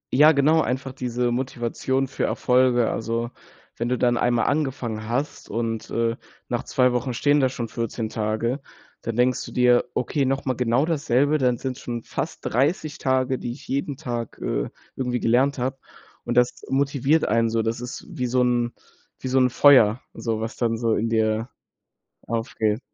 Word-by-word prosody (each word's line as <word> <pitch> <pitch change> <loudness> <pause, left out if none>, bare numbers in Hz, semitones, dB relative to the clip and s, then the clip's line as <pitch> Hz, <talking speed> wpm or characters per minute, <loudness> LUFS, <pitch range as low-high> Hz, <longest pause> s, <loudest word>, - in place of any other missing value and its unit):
Ja, 150 +4 +8
genau, 155 +2 +4
einfach 130 +1 -2
diese 125 -1 -1
Motivation 130 +1 -1
für 130 - -4
Erfolge. 125 -2 +2
Also, 115 +1 -2 0.5
wenn 120 +1 -1
du 125 - +1
dann 120 -1 +2
einmal 120 -1 +2
angefangen 125 -7 -2
hast 135 +5 -3
und, 115 0 -3
äh, 115 0 0 0.3
nach - - -1
2 125 -1 +2
Wochen 125 0 -1
stehen 145 +4 +3
da 130 -2 +3
schon 120 -2 -4
14 115 -1 -3
Tage, 110 +4 -1 0.4
dann 115 - -4
denkst 125 +1 +2
du - - -9
dir: 125 -1 +4
„Okay, 140 +2 0
noch 135 +1 -1
mal 130 - +1
genau 125 +3 +1
dasselbe, 145 -2 +2
dann 125 -2 +2
sind's 130 +1 -4
schon 120 -1 -5
fast - - -4
30 150 +4 0
Tage, 130 -1 +1
die 120 - -4
ich 135 - -14
jeden 140 0 -2
Tag, 120 -6 -5
äh, - - -2 0.3
irgendwie 125 -2 -1
gelernt 130 +5 +2
habe” 130 +2 -2 0.5
und 120 - -2
das 125 0 +2
motiviert 140 +3 +2
einen 115 0 +2
so. 115 0 0
Das 115 +1 -2
ist 125 0 -7
wie 125 - -3
so 125 +1 +2
'n 120 -1 +1 0.5
wie - - -5
so 130 +1 +3
'n 125 -1 +4
Feuer, 125 -4 +6
so 115 -2 -2
was 110 +1 -5
dann 115 -2 0
so 115 -1 +1
in 115 +2 0
dir 110 +1 +1 0.8
aufgeht. 110 -1 -1
125 Hz, 180 wpm, -24 LUFS, 115-135 Hz, 0.8 s, Ja